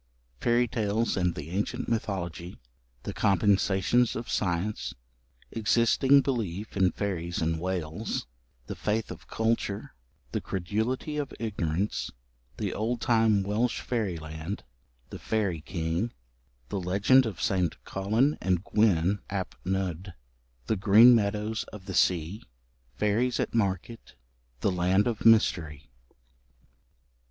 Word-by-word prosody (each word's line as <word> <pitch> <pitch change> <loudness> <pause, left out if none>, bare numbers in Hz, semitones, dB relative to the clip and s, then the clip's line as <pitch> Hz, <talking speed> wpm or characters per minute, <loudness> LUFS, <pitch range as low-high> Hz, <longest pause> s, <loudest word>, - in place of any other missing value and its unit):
Fairy 120 +1 +2
Tales 110 0 0
and 90 -3 0
the 80 - -7
Ancient 100 +3 -2
Mythology 95 -6 -3 0.5
The - - -4
Compensations 100 +4 +2
of 115 - -5
Science 90 -6 -1 0.6
Existing 115 +5 +4
Belief 110 -7 -3
in 95 -2 +3
Fairies 85 -4 -3
in 80 0 0
Wales 90 +2 -3 0.4
The - - -5
Faith 110 +1 -1
of - - -10
Culture 110 -3 -1 0.4
The - - -2
Credulity 110 - -2
of 145 -2 -3
Ignorance 100 -3 -2 0.5
The - - -2
Old 115 +3 -1
Time 110 -4 +3
Welsh 110 +5 0
Fairyland 85 -5 -4 0.5
The - - -7
Fairy 100 -8 -1
King 85 +6 -2 0.6
The 100 - -2
Legend 100 +8 +4
of 100 -6 -6
St. 90 -7 +1
Collen 110 +10 +1
and 90 -1 +1
Gwyn 100 -3 +2
ap 95 -2 -3
Nudd 95 -1 -3 0.5
The 110 - 0
Green 110 +6 +8
Meadows 105 0 0
of 100 -3 -11
the 95 - -5
Sea 90 +3 +1 0.5
Fairies 110 - +1
at - - -1
Market 100 - -2 0.5
The 100 - +2
Land 90 +3 +2
of 115 -2 +1
Mystery. 85 -9 +3
100 Hz, 120 wpm, -28 LUFS, 90-115 Hz, 0.6 s, Green